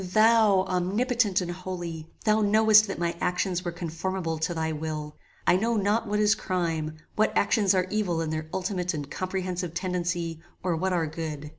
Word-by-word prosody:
"Thou, 215 +1 +4
Omnipotent 195 +3 +1
and 175 -1 -3
Holy! 175 -3 -6 0.2
Thou 215 0 +4
knowest 215 +1 +6
that 195 - -4
my 170 0 -1
actions 180 0 0
were 175 - -2
conformable 170 0 -3
to 160 - -1
thy 160 0 -1
will. 150 -1 -4 0.3
I 180 - +5
know 230 +3 +1
not 210 +3 +1
what 210 0 0
is 210 0 +5
crime; 165 -6 -2 0.2
what 215 - +2
actions 200 -1 +3
are 185 -1 +2
evil 200 -6 0
in 160 -1 -2
their 155 0 -3
ultimate 180 -2 -2
and 145 -1 -6
comprehensive 185 -2 -3
tendency 175 -3 -2 0.2
or 180 -2 +1
what 190 +4 -1
are 170 -3 +1
good. 150 -2 -5
180 Hz, 175 wpm, -27 LUFS, 165-205 Hz, 0.3 s, knowest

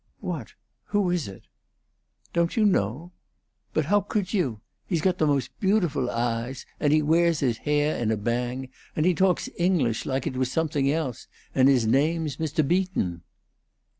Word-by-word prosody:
"What - - -5 0.3
who 205 -4 +1
is 175 -8 -1
it?" 95 - -10 0.9
"Don't 170 +3 +1
you 220 - +4
know? 155 - 0 0.6
But 155 - 0
ho' 205 +6 +3
could 200 -1 -2
you? 130 - 0 0.3
He's 170 - 0
got 180 +2 +1
the 155 - +3
most 140 -3 +1
beautiful 180 - +1
eyes, 120 +2 -2
and 145 - +2
he 155 0 +4
wea's 165 +1 +3
his 120 -5 +1
hai' 150 +1 +1
in 110 - +1
a 110 - +1
bang, 120 +4 -2 0.3
and 155 - +1
he 180 - +4
talks 185 0 +2
English 165 -11 +1
like 135 -1 -1
it 130 - -3
was 130 -1 0
something 145 -3 +1
else, 150 -7 -3 0.3
and 130 0 +5
his 125 -4 +3
name's 150 +4 +1
Mr. 155 -2 0
Beaton." 175 - 0
150 Hz, 165 wpm, -26 LUFS, 125-170 Hz, 0.9 s, and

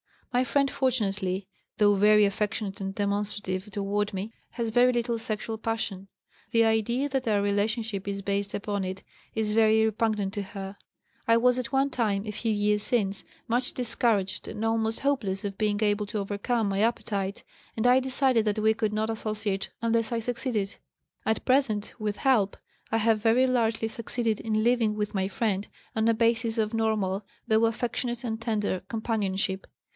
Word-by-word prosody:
My 250 +1 +3
friend, 275 0 +2
fortunately, 200 -8 0 0.3
though 205 -1 +5
very 210 +1 +5
affectionate 205 0 -2
and 195 0 -4
demonstrative 205 -1 -2
toward 205 +1 -1
me, 195 +3 -4 0.2
has 235 -2 -2
very 245 +2 +5
little 235 -1 0
sexual 220 -1 -3
passion. 220 -4 -3 0.4
The 230 -2 +4
idea 225 +5 +1
that 265 -3 -1
our 205 -2 +3
relationship 205 0 -1
is 200 0 -3
based 200 0 0
upon 205 -1 -2
it 185 +1 -5 0.3
is 220 -1 0
very 220 0 +4
repugnant 215 -2 0
to 205 - -1
her. 195 0 -7 0.5
I 230 - +6
was 250 +2 +4
at 250 +1 -5
one 270 +1 +3
time, 210 -5 0
a 210 - -3
few 220 +2 -2
years 210 0 +2
since, 205 -4 0 0.2
much 245 +2 +1
discouraged 225 -5 0
and 215 - -5
almost 225 0 0
hopeless 225 -9 0
of 195 -1 -4
being 210 -1 0
able 205 0 +1
to 210 0 -3
overcome 205 +2 -1
my 195 0 -1
appetite, 200 -3 -1 0.3
and 220 - 0
I 250 +1 +6
decided 260 -3 +2
that 210 -1 0
we 220 +1 +3
could 215 -1 -1
not 215 +1 0
associate 215 -3 -2
unless 230 0 +1
I 230 - +1
succeeded. 230 -3 -2 0.5
At 220 - 0
present, 255 -6 +2
with 210 -1 -1
help, 225 -8 +2 0.3
I 225 - +1
have 220 -1 +2
very 230 +3 +4
largely 225 -3 +1
succeeded 230 -1 -2
in 215 -1 0
living 230 -3 +2
with 210 -1 -2
my 190 -1 0
friend 200 -1 -1 0.3
on 220 0 +2
a 230 - +5
basis 230 0 +1
of 215 0 0
normal, 215 -3 0 0.2
though 220 0 +4
affectionate 240 +1 -2
and 225 -2 -3
tender, 210 -5 -1
companionship. 200 -4 -1
220 Hz, 170 wpm, -27 LUFS, 205-230 Hz, 0.5 s, I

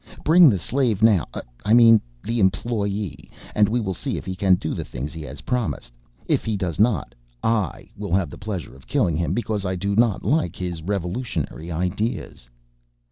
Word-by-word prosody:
Bring 165 0 +7
the 100 - +2
slave 115 +1 0
now... 105 -7 +5 0.4
I 105 +3 +4
mean 115 -2 +7 0.2
the 115 +1 -1
employee... 100 -2 -1 0.2
and 105 -1 +4
we 120 +3 +1
will 95 -4 -2
see - - -3
if - - -7
he 95 0 -4
can 95 0 +4
do 80 -3 -3
the - - -3
things 70 +6 -6
he 80 - -7
has 75 - -8
promised. 120 - -2 0.3
If - - +1
he 110 -2 -1
does 90 -4 -3
not, 110 -2 +2 0.3
I 110 -7 0
will 100 -3 -4
have 90 -7 0
the - - -10
pleasure 95 -9 -5
of 65 - -18
killing 85 - +1
him 85 +2 0
because 110 -4 -2
I 95 -1 -1
do 100 +2 -1
not 115 -2 +2
like 135 - +1
his 90 -3 -4
revolutionary 90 -1 -3
ideas." 90 - -3
100 Hz, 190 wpm, -23 LUFS, 90-115 Hz, 0.4 s, Bring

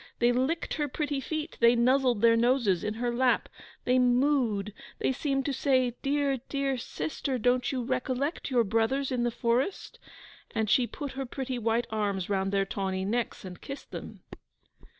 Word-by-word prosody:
They 240 +1 +4
licked 260 +7 0
her 295 -2 -1
pretty 290 0 -2
feet, 310 +3 -4
they 235 +1 +6
nuzzled 250 -1 +3
their 230 0 +7
noses 235 -6 +2
in 210 - -2
her 240 +1 -1
lap, 250 0 +2 0.4
they 250 +1 +3
moo'd, 245 -5 +2 0.2
they - - +1
seemed 270 0 -1
to 280 - 0
say, 255 -3 +2
'Dear, 280 -1 +1
dear 275 -1 0
sister 265 +2 -3
don't 245 +2 +1
you 255 -2 -2
recollect 260 +5 -2
your 245 -3 +3
brothers 230 +6 0
in 250 -2 0
the - - +2
forest?' 240 - -1 0.6
And 220 -2 0
she 250 -2 +4
put 285 +2 -6
her 270 -1 -5
pretty 260 0 -4
white 230 +1 +1
arms 205 -3 -1
round 195 -1 0
their 195 -1 +2
tawny 190 -1 -2
necks, 230 0 -2
and 180 -2 -9
kissed 275 +1 -8
them. - - -8
250 Hz, 170 wpm, -29 LUFS, 225-270 Hz, 0.6 s, their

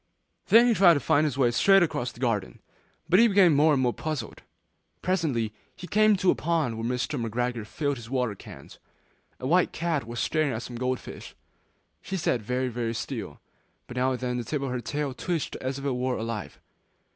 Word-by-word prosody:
Then 230 +2 +7
he 240 - +4
tried 180 -5 +6
to - - +1
find 145 +2 +2
his 140 -3 -2
way 125 -3 +3
straight 195 +9 +5
across 125 -7 -2
the 120 - -17
garden, 115 -7 -1 0.5
but 180 +3 +5
he 235 - +7
became 195 -6 +5
more 150 +2 +4
and 140 - +2
more 120 -1 +1
puzzled. 150 -8 -5 0.6
Presently, 145 - 0 0.2
he 180 - -9
came 215 +2 +4
to 190 -1 +3
a - - +2
pond 160 -8 -1
where 115 - -5
Mr. 130 0 -2
McGregor 120 0 -2
filled 145 +3 -2
his 115 -1 -10
water 125 -4 0
cans. 70 -8 -13 0.6
A - - -6
white 175 +6 +3
cat 160 -7 -2
was 120 +1 -5
staring 155 -4 0
at 110 +1 -4
some 120 - -8
gold 125 +1 -1
fish, - - -10 0.7
she 190 - -4
sat 125 -8 0
very, 125 +4 -1
very 120 -1 -3
still, 120 - -6 0.4
but 125 - -10
now 130 +1 +1
and 125 - -4
then 125 -1 -2
the - - -3
tip 140 +4 -3
of 135 - -3
her 125 -1 -3
tail 145 +3 -3
twitched 165 +1 -3
as 130 +1 -4
if 140 - -7
it 140 - +1
were 125 0 -1
alive. 110 -8 -5
130 Hz, 210 wpm, -26 LUFS, 120-160 Hz, 0.7 s, Then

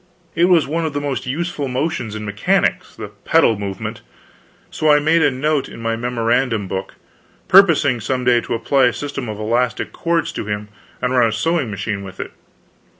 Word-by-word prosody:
It 170 +1 +3
was 175 -4 +4
one 165 +4 -2
of 155 -2 -2
the 145 - -1
most 140 -3 -3
useful 150 +1 -2
motions 125 -4 -2
in 105 0 -5
mechanics, 100 0 0
the - - -7
pedal 110 -3 +2
movement; 100 -2 -5 0.7
so 155 - 0
I 150 - +7
made 160 +3 +3
a 145 - +4
note 145 +2 -1
in - - -10
my 115 0 -1
memorandum 115 -2 0
book, 95 +1 -5 0.5
purposing 170 -10 +5
some 130 +2 -2
day 120 -1 +3
to - - -3
apply 130 +3 +2
a 120 - +2
system 140 -4 -5
of 105 - -5
elastic 115 +3 -1
cords 170 -2 -1
to - - -5
him 105 0 -4 0.3
and 125 0 +1
run 120 -2 +4
a - - -3
sewing 135 +4 0
machine 100 0 -4
with 95 -1 -10
it. - - -5
125 Hz, 190 wpm, -19 LUFS, 110-150 Hz, 0.7 s, I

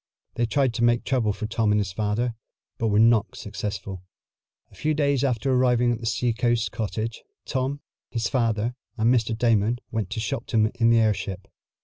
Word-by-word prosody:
They 120 - 0
tried 130 +1 +1
to 115 - -1
make 120 0 +3
trouble 120 -5 +1
for 105 - -4
Tom 110 0 +1
and 105 - +3
his 100 -2 -2
father, 110 +4 -1 0.5
but 115 - +1
were 105 -1 +2
not 115 -1 +4
successful. 100 -2 -5 0.7
A - - -18
few 155 0 0
days 140 -3 +1
after 130 0 +1
arriving 125 -1 +3
at 115 - -2
the 115 - -4
seacoast 120 +1 0
cottage, 110 +1 -4 0.2
Tom, 135 +2 -2 0.3
his 115 -3 -1
father 115 0 0 0.2
and 115 +2 +3
Mr. 115 -2 +1
Damon 115 0 +2
went 110 -5 -2
to 115 0 -4
Shopton 110 0 0
in 115 -1 +2
the 115 - +5
airship. 100 -4 0
115 Hz, 175 wpm, -25 LUFS, 105-120 Hz, 0.7 s, the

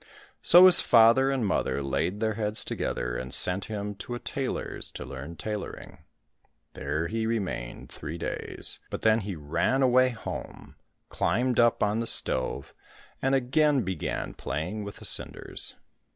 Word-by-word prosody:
So 175 +2 +8
his 185 -1 +8
father 115 +3 +5
and 135 -4 0
mother 70 -8 -1
laid 90 +9 -2
their 110 -1 +1
heads 105 0 -2
together, - - -3
and 65 +1 -5
sent 90 +7 0
him 105 -1 -5
to 120 - -6
a - - -6
tailor's 135 0 -4
to - - -7
learn 70 +6 -8
tailoring. 105 +2 -6 0.7
There 75 +4 -3
he 110 +5 -2
remained 95 - -4
three 80 - -7
days, 85 - -3
but - - -6
then 110 0 +4
he 100 -3 -5
ran 80 - 0
away 130 0 +4
home, 115 -2 -8 0.3
climbed 125 +1 0
up 120 -1 +3
on 105 +2 +1
the 115 - -2
stove, 65 - +3 0.5
and 135 +1 +2
again 135 +1 +2
began 95 -4 -4
playing 90 +8 -4
with 100 0 -8
the - - -11
cinders. - - 0
110 Hz, 150 wpm, -27 LUFS, 85-125 Hz, 0.7 s, So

